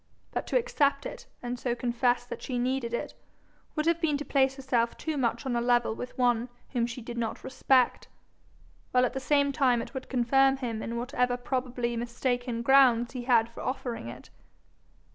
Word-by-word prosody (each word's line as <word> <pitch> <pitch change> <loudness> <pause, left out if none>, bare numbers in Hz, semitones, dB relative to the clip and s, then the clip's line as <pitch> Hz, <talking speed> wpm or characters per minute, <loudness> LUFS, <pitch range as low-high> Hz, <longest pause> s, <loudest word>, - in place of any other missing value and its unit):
But - - -3
to - - +2
accept 285 - +1
it, - - -7 0.2
and 245 0 -4
so 240 -1 -1
confess 245 0 +1
that - - -7
she 255 - -3
needed 250 -1 -1
it, 235 - -3 0.6
would 305 -1 0
have 335 0 +2
been 300 -4 +2
to 290 - -6
place 270 0 +2
herself 250 -3 0
too 315 -1 -3
much 235 -3 -1
on 255 -2 -1
a 235 - +1
level 240 -1 +2
with 245 +2 -7
one 245 -1 +2 0.2
whom 235 -3 +1
she 240 0 -7
did 235 +1 -5
not 225 -1 -3
respect, 260 -1 +2 0.9
while 250 0 +5
at - - -2
the 265 - -2
same 280 +1 +2
time 260 -4 +3
it 230 - -6
would 265 -1 -6
confirm 270 +2 +3
him 230 -4 -3
in 235 +1 -4
whatever 250 0 0
probably 245 -1 -2
mistaken 240 0 -2
grounds 245 -2 +5
he 250 -2 -5
had 235 -3 +4
for 230 - -10
offering 255 - -4
it. 125 +2 -11
250 Hz, 190 wpm, -28 LUFS, 235-270 Hz, 0.9 s, while